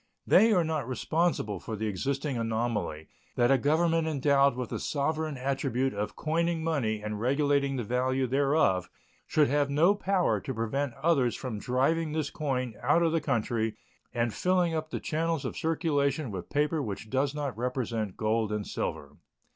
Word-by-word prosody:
They 225 +1 +6
are 180 -5 +4
not 155 -5 -2
responsible 130 - 0
for 110 - -5
the 110 +1 -3
existing 135 +7 -2
anomaly 110 -9 -2 0.3
that 120 +2 +3
a 135 - +6
Government 165 +3 +2
endowed 140 -2 +3
with 125 -2 -4
the - - -2
sovereign 155 0 -1
attribute 135 0 -1
of 105 +1 -3
coining 165 +1 0
money 115 -10 -1
and 105 -1 -4
regulating 140 +2 +2
the 125 - -2
value 130 +3 0
thereof 135 - +2 0.4
should 150 -2 +3
have 145 +1 +1
no 160 +8 +4
power 195 -3 +1
to 130 - -5
prevent 120 +4 -2
others 135 -5 +2
from 120 -6 -5
driving 150 +7 0
this 155 -2 -2
coin 130 -6 -2
out 170 - +3
of 165 - +2
the 165 0 +1
country 115 -5 -1 0.4
and 120 -2 -1
filling 180 -2 +1
up 155 0 -2
the - - -3
channels 165 -1 -1
of - - -3
circulation 150 -5 0
with 95 -3 -6
paper 150 +2 +1
which 105 -2 -6
does 135 +2 0
not 145 -5 -3
represent 115 -4 -2
gold 110 0 0
and 105 -1 -2
silver. 70 0 -4
135 Hz, 170 wpm, -29 LUFS, 115-155 Hz, 0.4 s, They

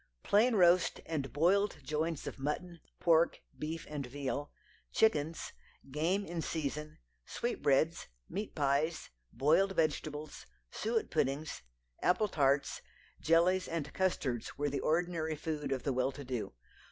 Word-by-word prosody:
Plain 225 +4 +4
roast 180 -2 +4
and 145 -4 -3
boiled 195 +7 +3
joints 155 +2 -2
of - - -6
mutton, 170 +5 -3 0.2
pork, 165 0 +4 0.2
beef 160 +2 -4
and 150 -2 -4
veal, 140 +2 -4 0.4
chickens, 165 -7 +1 0.4
game 175 +8 +1
in 170 0 -3
season, 150 -1 -3 0.3
sweetbreads, 160 - 0 0.2
meat 205 +3 -5
pies, 145 +3 0 0.2
boiled 175 +8 +3
vegetables, 155 -1 -2 0.2
suet 225 +1 -1
puddings, 150 +1 -1 0.4
apple 210 +4 +3
tarts, 140 -3 +1 0.4
jellies 180 +3 +3
and 155 -3 -3
custards 140 -11 -1
were 145 0 0
the 140 - -1
ordinary 160 -1 0
food 150 -2 -3
of 130 -2 -1
the 140 - 0
well 130 +2 +1
to 140 +1 -9
do. 125 - -3
155 Hz, 130 wpm, -33 LUFS, 145-175 Hz, 0.4 s, Plain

